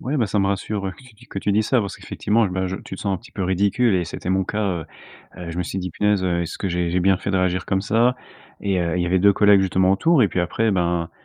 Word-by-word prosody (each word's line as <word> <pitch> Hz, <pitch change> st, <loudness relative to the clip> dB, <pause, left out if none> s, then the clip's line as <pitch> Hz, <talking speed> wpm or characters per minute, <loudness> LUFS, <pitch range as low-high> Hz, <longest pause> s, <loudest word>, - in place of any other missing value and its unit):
Ouais, 140 Hz, +4 st, -2 dB
bah, 120 Hz, -6 st, +1 dB
ça 100 Hz, +1 st, 0 dB
me 95 Hz, -, +1 dB
rassure 100 Hz, 0 st, -2 dB
que 130 Hz, -, -17 dB
tu 125 Hz, -3 st, -17 dB
dis 115 Hz, +3 st, -19 dB
que 100 Hz, -, -6 dB
tu 100 Hz, -, 0 dB
dises 105 Hz, +1 st, +1 dB
ça 130 Hz, -, +3 dB
parce 100 Hz, -2 st, -5 dB
qu'effectivement 110 Hz, +3 st, 0 dB
m 90 Hz, -, -5 dB
là 95 Hz, 0 st, -1 dB
je 95 Hz, -, -4 dB
tu 95 Hz, -, -8 dB
te -, -, -10 dB
sens 100 Hz, -2 st, -1 dB
un -, -, -1 dB
petit 115 Hz, -, -15 dB
peu 95 Hz, -, -3 dB
ridicule 100 Hz, +5 st, +2 dB
et 90 Hz, -1 st, +1 dB
c'était 90 Hz, -, -7 dB
mon 95 Hz, +1 st, +2 dB
cas. 105 Hz, +3 st, -3 dB, 0.2 s
Heu, -, -, -8 dB, 0.5 s
heu, 90 Hz, -1 st, -6 dB
je 85 Hz, -, -7 dB
me 90 Hz, -, 0 dB
suis 90 Hz, +2 st, -4 dB
dit: 90 Hz, -1 st, -4 dB
«Punaise, 105 Hz, 0 st, +1 dB
heu, 85 Hz, -1 st, 0 dB
est-ce 85 Hz, -, -6 dB
que 95 Hz, -, -2 dB
j'ai 90 Hz, -1 st, -1 dB
j'ai 90 Hz, -, +1 dB
bien 95 Hz, +1 st, +3 dB
fait 100 Hz, -, -4 dB
de 95 Hz, -, +1 dB
réagir 90 Hz, 0 st, 0 dB
comme 95 Hz, -, 0 dB
ça?» 115 Hz, +5 st, +2 dB, 0.4 s
et 95 Hz, -2 st, 0 dB
heu, 85 Hz, -1 st, -1 dB
il 90 Hz, -, 0 dB
y -, -, -1 dB
avait 90 Hz, +1 st, +2 dB
2 100 Hz, +2 st, +6 dB
collègues, 105 Hz, 0 st, +5 dB
justement, 95 Hz, 0 st, +2 dB
autour 160 Hz, -, +3 dB
et 105 Hz, -, +3 dB
puis 90 Hz, -, -1 dB
après, 105 Hz, +5 st, 0 dB
ben, 85 Hz, -2 st, 0 dB
95 Hz, 315 wpm, -22 LUFS, 90-105 Hz, 0.5 s, 2